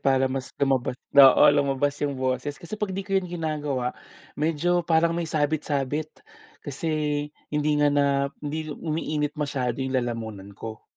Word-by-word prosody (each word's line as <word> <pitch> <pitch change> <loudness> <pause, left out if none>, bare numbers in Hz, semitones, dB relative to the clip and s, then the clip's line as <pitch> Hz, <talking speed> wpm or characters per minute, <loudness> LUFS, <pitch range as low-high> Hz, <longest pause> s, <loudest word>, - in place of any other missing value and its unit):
para 135 -1 +3
mas 130 0 -3
lumabas 135 -3 +1 0.2
oo, 135 -2 +8
lumabas 140 0 +1
yung 140 -2 -1
boses, 130 +2 -2
kasi 170 +8 -7
'pag 210 -2 -2
'di 195 - -3
ko 200 - -15
yun 185 -2 0
ginagawa, 150 -7 -2 0.4
medyo 165 +4 +1
parang 165 0 +3
may 170 -2 -2
sabit-sabit. 150 -1 -1 0.5
Kasi, 150 0 -1 0.2
hindi 150 0 +1
nga 145 0 +3
na 145 0 +3 0.3
hindi 155 +1 -4
umiinit 150 -1 -2
masyado 135 -4 -2
yung 130 0 -3
lalamunan 110 -5 -5
ko. 110 +1 -8
145 Hz, 150 wpm, -25 LUFS, 135-155 Hz, 0.5 s, oo